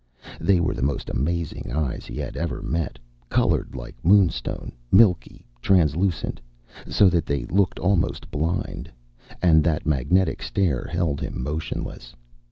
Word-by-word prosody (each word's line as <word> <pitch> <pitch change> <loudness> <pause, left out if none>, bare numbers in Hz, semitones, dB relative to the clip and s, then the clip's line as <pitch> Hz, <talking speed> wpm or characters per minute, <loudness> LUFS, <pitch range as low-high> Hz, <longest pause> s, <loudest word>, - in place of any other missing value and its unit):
They 95 -3 +3
were 85 - 0
the - - -5
most 70 +2 -1
amazing 85 +4 -2
eyes 75 -4 -2
he - - -7
had - - -4
ever 85 -1 -3
met, 80 -6 -2 0.3
colored - - +1
like - - -7
moonstone, 95 0 +2 0.2
milkily 95 -4 +3 0.2
translucent, 85 0 +1 0.5
so 100 - +4
that 85 -2 +1
they 70 -4 -1
looked 95 +7 +1
almost 90 -2 0
blind. 80 +5 -2 0.5
And 80 -3 +5
that 75 -1 0
magnetic 80 +6 +1
stare 85 -11 -1
held 85 -5 -1
him - - -4
motionless. 65 -4 -5
85 Hz, 135 wpm, -24 LUFS, 70-90 Hz, 0.5 s, And